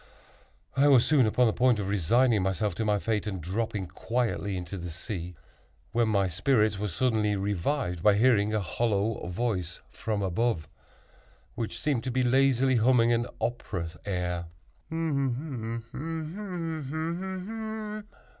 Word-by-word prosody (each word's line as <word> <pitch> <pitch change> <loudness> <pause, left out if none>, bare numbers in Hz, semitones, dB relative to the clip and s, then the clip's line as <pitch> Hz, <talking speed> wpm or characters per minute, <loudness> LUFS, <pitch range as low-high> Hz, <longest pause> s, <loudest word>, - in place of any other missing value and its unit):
I 140 +2 +5
was 130 -4 +6
soon 140 -7 +4
upon 125 +3 +3
the 110 - +3
point 125 -1 +3
of 100 -2 -2
resigning 105 +4 +3
myself 95 +1 0
to 100 - -2
my 105 -1 +2
fate, 105 +1 -1
and 95 -3 -3
dropping 100 +3 -2
quietly 100 +1 -2
into 90 +1 -5
the 85 0 -5
sea, 90 0 -5 0.6
when 115 -1 +2
my 100 -3 +2
spirits 105 +3 +2
were 105 - -1
suddenly 105 +1 +1
revived 100 - -1
by 105 +2 +5
hearing 105 -2 +4
a 110 -1 +1
hollow 105 +2 0
voice 90 -3 -2
from 105 -2 -2
above, 95 -2 0 0.9
which 115 -3 -4
seemed 140 -6 0
to - - -1
be 130 +1 +1
lazily 130 0 +3
humming 120 0 +4
an 120 +1 +1
opera 90 -8 -3
air. 90 -3 -2
105 Hz, 130 wpm, -28 LUFS, 95-120 Hz, 0.9 s, was